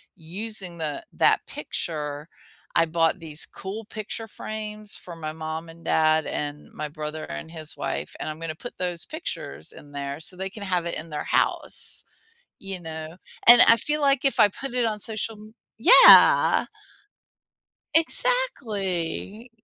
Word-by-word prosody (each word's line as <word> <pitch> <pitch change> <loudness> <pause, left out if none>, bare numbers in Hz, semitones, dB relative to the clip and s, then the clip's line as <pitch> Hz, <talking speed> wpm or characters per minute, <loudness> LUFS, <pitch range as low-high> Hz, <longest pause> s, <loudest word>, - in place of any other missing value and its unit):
using 185 +1 -4
the 150 -3 -4
that - - +3
picture. 150 -1 -4 0.5
I 165 - +4
bought 165 +2 +1
these 160 -2 +2
cool 205 +3 -8
picture 220 +1 -6
frames 215 -1 -7
for 175 - -10
my 155 -2 -6
mom 160 +1 -6
and 165 +1 -15
dad, 155 -1 +2
and 145 0 -5
my 150 - -5
brother 155 +1 -6
and 75 - -8
his 155 -2 -4
wife, - - -4
and - - -4
I'm 155 +1 -7
gonna 165 -1 -5
put 245 +9 -10
those 175 -3 -2
pictures 315 +3 -5
in 145 - -14
there 140 0 -5
so 170 +3 0
they 190 +1 -4
can 210 - -11
have 180 -3 -1
it 170 - -3
in 160 +1 -8
their 150 -1 -4
house. - - +2 0.6
You 195 -2 -7
know? 160 0 -8 0.3
And 240 0 +10
I 230 - +7
feel 300 +6 -2
like 275 -1 +2
if 275 - +1
I 205 - +6
put 270 +5 -7
it 250 -1 +1
on 215 -1 -2
social 220 +1 -1
m 215 +1 -14 0.2
Yeah! - - +8 1.3
Exactly. 225 - 0
175 Hz, 160 wpm, -24 LUFS, 155-215 Hz, 1.3 s, And